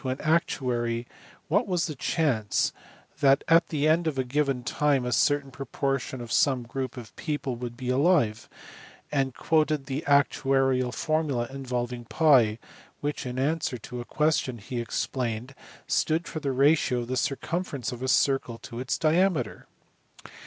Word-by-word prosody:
an 130 0 -2
actuary 125 -7 0 0.4
what 195 +7 +2
was 175 -4 +1
the 155 - -4
chance 130 - 0 0.5
that 140 -2 +4
at 165 +1 +5
the 150 -1 0
end 165 +2 +3
of 150 -4 -1
a 130 - +1
given 135 -1 0
time 140 -1 +1
a 125 - -2
certain 145 +2 +2
proportion 135 -1 -3
of 120 -2 -7
some 130 -4 +3
group 130 +2 -5
of 115 -4 -10
people 145 -5 -3
would 120 0 -6
be 125 0 -4
alive; 135 -5 +2 0.6
and 135 -3 0
quoted 155 -3 +1
the 135 +3 -3
actuarial 135 -2 +3
formu]a 150 -6 -1
involving 125 -2 -3
TT, 125 -7 +4 0.4
which 145 -2 -3
in 125 0 -5
answer 140 -1 0
to 120 +2 -7
a - - -8
question 150 -5 0
he 120 +3 -5
explained 120 +1 -3 0.3
stood 165 +2 0
for 155 - -4
the 140 -3 -2
ratio 135 -2 +3
of 120 - -6
the 130 - -2
circumference 140 0 -2
of 125 0 -7
a 130 - -2
circle 130 -3 +2
to 115 0 -9
its 125 -2 -1
diameter. 160 - +1
135 Hz, 155 wpm, -27 LUFS, 125-150 Hz, 0.6 s, at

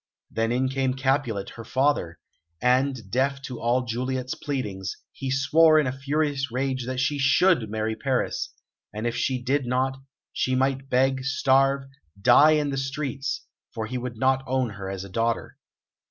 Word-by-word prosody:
Then 115 +1 0
in 130 +2 +1
came 130 -1 0
Capulet, 130 -7 0
her 115 - -9
father, 130 - 0 0.4
and, 125 -4 +1
deaf 135 +3 +1
to 125 -4 -6
all 125 +2 +1
Juliet's 130 +2 -2
pleadings, 105 -10 -4
he 135 - -5
swore 155 +4 +5
in 155 - +4
a 130 - 0
furious 140 0 -1
rage 130 0 -2
that 130 0 -2
she 140 +2 0
should 135 - +3
marry 110 +1 -2
Paris; 130 +3 -1 0.4
and 105 +3 -5
if 120 0 -1
she 130 0 0
did 135 +1 0
not, 130 +2 0 0.4
she 130 - 0
might 135 +1 0
beg, 130 +1 +2
starve, 135 0 +2 0.4
die 135 +8 +6
in 150 -2 +1
the 135 - -2
streets, 135 0 -3 0.3
for 110 - -2
he 125 +3 -4
would 120 -2 -6
not 130 +2 +2
own 130 -2 0
her 100 -2 -6
as 95 -1 -5
a - - -8
daughter. 115 +4 -2
130 Hz, 170 wpm, -25 LUFS, 120-135 Hz, 0.4 s, die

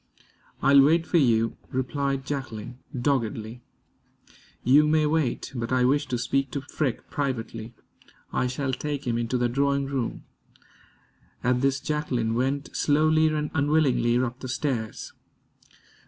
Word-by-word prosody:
"I'll 140 0 +7
wait 160 +4 +4
for 175 - +3
you," 115 -4 +2
replied 135 +1 -2
Jacqueline, 125 -4 -5 0.2
doggedly. 120 -3 -1 1.0
"You 145 +4 +5
may 155 0 +3
wait, 150 -5 0
but 120 -1 -4
I 125 -1 +3
wish 145 +3 +2
to 125 - -1
speak 135 +3 0
to 140 - -2
Freke 135 -2 -3
privately. 120 -4 -3 0.6
I 125 - +1
shall 130 +1 -2
take 145 +2 -3
him 120 -1 0
into 120 +2 -1
the 120 0 +2
drawing 140 +2 +1
room." 135 -3 -3 1.2
At 125 +1 +2
this, 135 0 +2
Jacqueline 130 -8 -1
went 135 +4 -1
slowly 155 +2 +3
and 150 -1 -1
unwillingly 145 -5 +2
up 125 0 -1
the 130 - -6
stairs. 125 -5 -3
135 Hz, 135 wpm, -26 LUFS, 120-145 Hz, 1.2 s, I'll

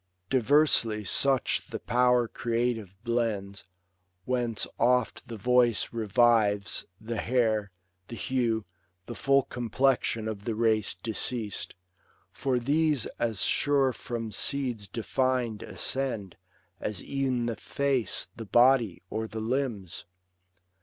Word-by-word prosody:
Diversely 130 -4 +3
such 135 +6 +2
the - - -5
power 125 -1 +2
creative 115 -5 -2
blends; 110 -5 -2 0.6
Whence 120 -4 -1
oft 125 0 +1
the 115 - -7
voice 120 +1 +2
revives, 110 -2 +2
the 115 +1 -5
hair, 110 -4 +1 0.4
the 115 - -7
hue. 115 -2 -1 0.4
The - - -6
full 135 0 +3
complexion 120 -2 0
of 105 -2 -5
the 115 0 -2
race 110 -2 +1
deceas'd; 110 +2 -2 0.6
For 130 -2 -1
these 145 +1 +1
as 110 -4 0
sure 140 -3 +2
from 115 -2 -5
seeds 125 -5 -1
defin'd 120 +1 -1
ascend 115 -9 -2 0.4
As 105 -3 -3
e'en 130 -3 -1
the 115 -1 -2
face, 135 -3 -1
the 115 - -7
body, 120 -4 +3
or 110 0 -2
the 110 - -6
limbs. 115 -5 -3
120 Hz, 110 wpm, -28 LUFS, 110-130 Hz, 0.6 s, Diversely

